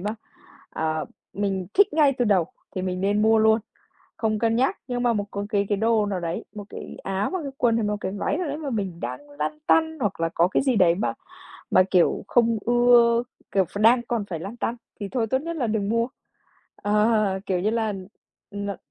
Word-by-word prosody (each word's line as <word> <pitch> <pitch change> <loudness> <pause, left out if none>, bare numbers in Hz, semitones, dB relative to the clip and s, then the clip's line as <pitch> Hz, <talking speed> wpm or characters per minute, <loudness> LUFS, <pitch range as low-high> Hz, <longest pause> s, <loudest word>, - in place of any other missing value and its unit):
ma, 210 +4 -3 0.6
à, 155 0 -2 0.3
mình 195 -3 -2
thích 405 +1 +5
ngay 295 -3 +4
từ 245 - +3
đầu 190 -6 +3 0.3
thì 185 - -2
mình 185 -1 -2
nên 205 +2 +1
mua 220 0 +5
luôn, 220 +1 +4 0.6
không 215 -2 0
cân 225 0 +2
nhắc. 260 +3 +1
Nhưng 245 -1 -2
mà 240 -1 +3
một 205 -2 -1
có 200 0 -3
cái 200 -2 +1
cái 205 - +1
đồ 220 -1 +2
nào 195 -3 -2
đấy, 170 0 -4
một 205 - -6
cái - - -8
áo 195 +1 -1
hoặc 375 -3 -2
cái 275 - -5
quần 235 -2 +3
hay 225 - 0
một 210 0 0
cái 190 - -2
váy 205 +9 -1
nào 360 -3 -2
đấy 290 +1 -3
mà 295 -3 -4
mình 195 -7 -3
đang 290 0 -6
lăn 290 +1 -4
tăn 320 -1 +3
hoặc 205 -7 -1
là 165 0 +1
có 170 +1 +2
cái 200 - +1
gì 260 -3 +2
đấy 175 -4 +4
mà 205 - -1 0.6
mà - - +6
kiểu 180 +1 +3
không 230 -2 +3
ưa, 240 -1 +5 0.3
kiểu, 195 -1 +3
ph 200 - -8
đang 235 +2 +5
còn 235 -3 -2
phải 170 -5 -5
lăn 200 +7 -7
tăn, 235 0 -2 0.2
thì 200 - -3
thôi 235 -1 -1
tốt 260 +4 +1
nhất 335 0 -4
là 250 -6 0
đừng 215 -2 -1
mua. 230 +2 +1 0.7
Ờ, 210 -2 +2
kiểu 185 -2 0
như 210 +3 +1
là, 225 -2 0 0.6
ừm, 200 0 -5
ờ 200 - -3
215 Hz, 230 wpm, -24 LUFS, 195-240 Hz, 0.7 s, mà